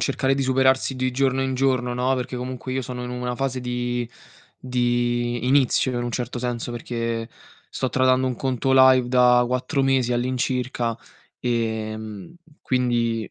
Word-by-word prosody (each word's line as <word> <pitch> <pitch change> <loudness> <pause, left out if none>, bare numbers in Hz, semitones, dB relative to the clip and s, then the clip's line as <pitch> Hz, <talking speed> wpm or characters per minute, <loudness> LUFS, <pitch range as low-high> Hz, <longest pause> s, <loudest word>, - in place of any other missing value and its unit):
cercare 135 -1 +1
di 135 - -1
superarsi 130 0 +2
di 130 0 -1
giorno 135 +1 +1
in 130 0 -1
giorno, 130 -2 +1
no. 125 +2 +1
Perché 125 0 -4
comunque 130 +1 -5
io 130 0 -1
sono 125 0 -6
in 125 - -5
una 125 0 -3
fase 130 -1 -2
di 120 -1 -2 0.5
di 120 -1 0
inizio 130 -1 +3
in 120 - -1
un 120 - -3
certo 120 +1 -3
senso, 120 -1 -3
perché 115 -1 -3 0.4
sto 130 - -2
tradando 130 0 +2
un 130 - -1
conto 130 0 -1
live 130 -1 +6
da 125 -1 +5
4 125 +3 -1
mesi 130 -2 +2
all'incirca 125 -1 -1 0.4
e, 110 -3 -1
mhmm, 110 - -9 0.3
quindi 120 -4 0
125 Hz, 160 wpm, -23 LUFS, 120-130 Hz, 0.5 s, live